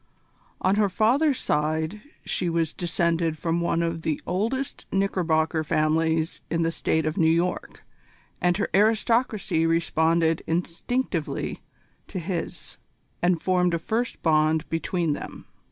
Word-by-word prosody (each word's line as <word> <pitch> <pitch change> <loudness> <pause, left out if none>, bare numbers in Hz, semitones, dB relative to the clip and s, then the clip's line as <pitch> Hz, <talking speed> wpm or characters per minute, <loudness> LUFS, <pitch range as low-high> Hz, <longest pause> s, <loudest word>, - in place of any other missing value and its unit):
On 190 +2 +2
her 210 -2 +3
father's 255 - +2
side 155 +6 -1 0.2
she 180 - -1
was 165 -2 0
descended 170 -2 0
from 165 +1 -1
one 170 0 +1
of 165 -1 -2
the 155 -2 -1
oldest 230 +9 -2
Knickerbocker 165 -5 +1
families 160 +1 +1
in 165 0 0
the 165 - +1
State 160 -1 0
of 155 +5 -1
New 160 -1 +4
York 170 +2 -1 0.6
and 175 0 +2
her 205 - 0
aristocracy 215 -4 +2
responded 165 0 +2
instinctively 170 +2 -2 0.5
to - - -6
his, 175 -1 -5 0.4
and 175 -2 +2
formed 180 -2 +2
a - - +1
first 225 +8 -2
bond 155 0 +2
between 165 -1 0
them. - - -8
170 Hz, 130 wpm, -25 LUFS, 160-190 Hz, 0.6 s, New